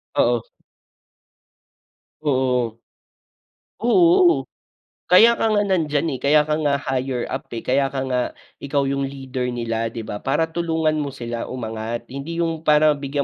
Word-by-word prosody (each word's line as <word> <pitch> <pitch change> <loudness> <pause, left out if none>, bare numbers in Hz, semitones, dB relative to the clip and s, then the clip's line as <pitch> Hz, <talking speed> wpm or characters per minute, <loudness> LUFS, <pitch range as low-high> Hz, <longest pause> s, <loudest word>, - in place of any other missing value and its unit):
Oo. 120 -1 +3 1.8
Oo. 125 -5 0 1.0
Oo, 345 +8 +4 0.6
kaya 230 +6 +6
ka - - +1
nga 205 -1 +3
nandiyan, 160 -5 0
eh, - - -17
kaya 150 +2 +4
ka 150 0 -1
nga 145 -2 +1
higher 130 -2 -2
up, - - -4
eh, 115 - -4
kaya 135 +2 +2
ka 135 - -2
nga 125 0 +1 0.4
ikaw 140 0 -1
yung 140 0 -1
leader 135 -2 -4
nila, 115 -2 -2
'di 115 - -5
ba. 105 -1 -6
Para 160 +4 0
tulungan 160 -2 0
mo 140 -2 -3
sila 120 -3 -5
umangat. 115 -1 -5
Hindi 150 +6 -4
yung 165 -1 -2
para 150 0 +5
bigyan 140 0 -2
140 Hz, 145 wpm, -21 LUFS, 125-160 Hz, 1.8 s, kaya